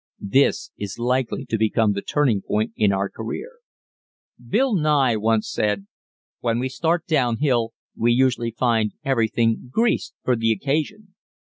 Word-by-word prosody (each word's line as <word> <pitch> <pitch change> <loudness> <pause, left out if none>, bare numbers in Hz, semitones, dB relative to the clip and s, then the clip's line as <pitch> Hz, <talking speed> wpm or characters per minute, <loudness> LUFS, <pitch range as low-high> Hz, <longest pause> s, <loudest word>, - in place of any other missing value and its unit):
This 140 +1 +3
is 100 -2 -5
likely 125 +1 -1
to 110 - -2
become 110 -1 +2
the 100 - -3
turning 130 -8 +1
point 110 +3 -1
in 105 -2 +3
our 100 0 0
career. 115 - -6 0.9
Bill 265 -3 +1
Nye 150 - +3
once 110 0 +1
said 105 -2 -1 0.5
"When 115 -1 0
we 130 +2 -1
start 165 +4 0
down 125 -8 +1
hill 120 -5 +1 0.2
we 120 +1 +2
usually 120 -1 +2
find 115 -2 0
everything 115 -2 +1
greased 230 - 0
for 125 - +2
the 115 -1 +1
occasion." 160 - -2
120 Hz, 145 wpm, -22 LUFS, 110-140 Hz, 0.9 s, This